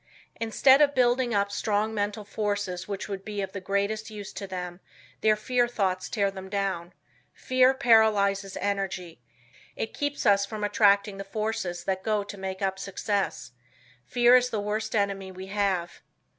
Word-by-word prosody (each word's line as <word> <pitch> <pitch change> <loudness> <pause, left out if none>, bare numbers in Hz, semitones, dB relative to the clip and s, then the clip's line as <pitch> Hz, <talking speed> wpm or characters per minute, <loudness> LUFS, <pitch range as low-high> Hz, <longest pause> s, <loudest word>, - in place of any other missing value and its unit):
Instead 265 +5 +4
of 285 -1 +4
building 245 0 +3
up 200 -1 +1
strong 210 +1 0
mental 205 0 -2
forces 205 -3 -3
which 200 -2 -4
would 195 -2 -5
be 210 0 -5
of 195 -1 -3
the 195 - -6
greatest 200 +3 -1
use 210 -2 -8
to 200 - -6
them 180 -1 -6 0.4
their 215 +7 +4
fear 245 +3 +1
thoughts 190 -6 -1
tear 200 -3 +1
them 190 0 -9
down. 195 -3 -2 0.4
Fear 255 +1 +3
paralyzes 210 -6 +3
energy. 190 -7 -3 0.5
It 220 - -4
keeps 290 0 -3
us 200 -1 +5
from 210 +1 -5
attracting 200 -1 +3
the 195 - -5
forces 195 -4 -3
that 190 -1 -1
go 210 0 0
to 205 - -8
make 190 0 -5
up 190 0 -1
success. 195 - -2 0.6
Fear 245 +1 +6
is 250 0 +1
the 220 -3 -2
worst 215 +2 -2
enemy 195 -2 -1
we 185 0 -8
have. 195 -4 -1
200 Hz, 165 wpm, -27 LUFS, 195-220 Hz, 0.6 s, Fear